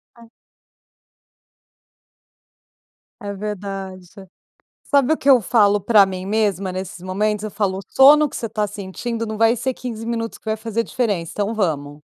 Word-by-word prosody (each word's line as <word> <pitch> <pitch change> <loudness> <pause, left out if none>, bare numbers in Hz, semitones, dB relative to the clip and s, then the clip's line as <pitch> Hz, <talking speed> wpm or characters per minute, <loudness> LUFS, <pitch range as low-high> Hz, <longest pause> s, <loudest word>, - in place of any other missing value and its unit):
Ah. 235 -1 -17 2.9
É 205 -2 -5
verdade. 195 -2 -6 0.8
Sabe 280 +1 +3
o - - -2
que 280 - 0
eu 260 -2 +8
falo 205 -2 +3
pra 205 0 +5
mim 185 -1 -6
mesma 200 -2 0
nesses 185 -1 -6
momentos? 210 +3 -1
Eu 215 - -5
falo: 195 -3 -1
"O - - -5
sono 295 +3 +6
que - - -10
você 230 - -4
tá 210 -1 -1
sentindo 210 +4 -5
não 215 -1 -5
vai 225 +2 +4
ser 260 +2 -2
15 230 -3 -7
minutos 230 -1 -3
que - - -35
vai 220 0 -1
fazer 225 +1 -2
diferença, 205 -10 -2
então 205 +2 -2
vamos". 150 -8 -2
210 Hz, 160 wpm, -20 LUFS, 190-230 Hz, 2.9 s, eu